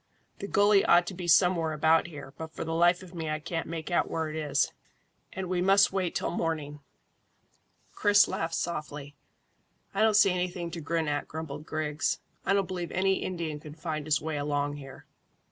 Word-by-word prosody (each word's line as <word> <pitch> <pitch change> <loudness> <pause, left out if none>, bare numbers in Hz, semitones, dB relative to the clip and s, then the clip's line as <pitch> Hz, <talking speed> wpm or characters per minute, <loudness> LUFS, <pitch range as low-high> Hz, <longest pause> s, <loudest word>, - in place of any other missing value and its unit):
"The 200 - -5
gully 205 0 +4
ought 175 0 +5
to 190 - -5
be 180 -1 -6
somewhere 170 -2 +4
about 160 +2 +3
here, 145 -4 -10
but 160 0 -7
for - - -4
the 165 0 -3
life 175 +2 +3
of 180 -1 -13
me 165 -3 -4
I 155 - -1
can't 165 +2 -4
make 165 +1 -5
out 175 - +1
where 160 -1 -2
it 155 - -6
is, 145 -3 0 0.6
and 190 0 -5
we 180 0 0
must 195 +1 +5
wait 185 -3 -1
till - - -1
morning." 155 -4 -3 1.1
Chris 205 0 +5
laughed 165 0 -2
softly. 150 -4 -4 0.8
"I 195 - 0
don't 220 -1 +4
see 195 -2 +6
anything 180 -1 -2
to 165 -1 -6
grin 160 +1 -1
at," 145 0 -1
grumbled 155 -1 -7
Griggs. 155 -1 -1 0.3
"I - - +4
don't 195 -2 +1
believe 180 -2 -4
any 190 +1 +2
Indian 165 -5 -3
could 150 +1 -11
find 155 -2 -4
his 150 - +3
way 155 0 -3
along 145 0 -1
here." 135 -2 -11
165 Hz, 195 wpm, -28 LUFS, 150-180 Hz, 1.1 s, see